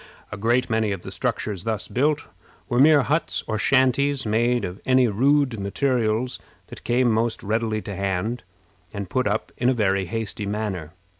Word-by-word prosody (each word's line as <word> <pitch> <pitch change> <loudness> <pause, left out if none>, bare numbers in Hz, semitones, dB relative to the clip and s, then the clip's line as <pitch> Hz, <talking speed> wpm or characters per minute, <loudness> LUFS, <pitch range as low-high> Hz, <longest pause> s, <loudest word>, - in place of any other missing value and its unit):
A - - -4
great 120 +5 +1
many 110 -2 0
of 95 -3 -4
the - - -7
structures 100 -5 -3
thus 110 -1 -2
built 145 +3 0 0.4
were 120 -2 0
mere 145 0 +6
huts 155 +4 0
or 110 -1 -2
shanties, 135 +3 +2
made 120 +3 +1
of 90 +2 -7
any 130 -1 +4
rude 130 +2 +2
materials 115 +3 0 0.3
that - - -11
came 120 0 +2
most 115 +1 0
readily 110 0 -1
to 100 - -6
hand, 100 +5 -2 0.5
and 100 -3 -6
put 130 -4 +1
up 105 +2 -2
in 120 - +2
a 130 - +2
very 95 -4 +1
hasty 105 0 -4
manner. 100 -6 -3
115 Hz, 170 wpm, -23 LUFS, 105-130 Hz, 0.5 s, mere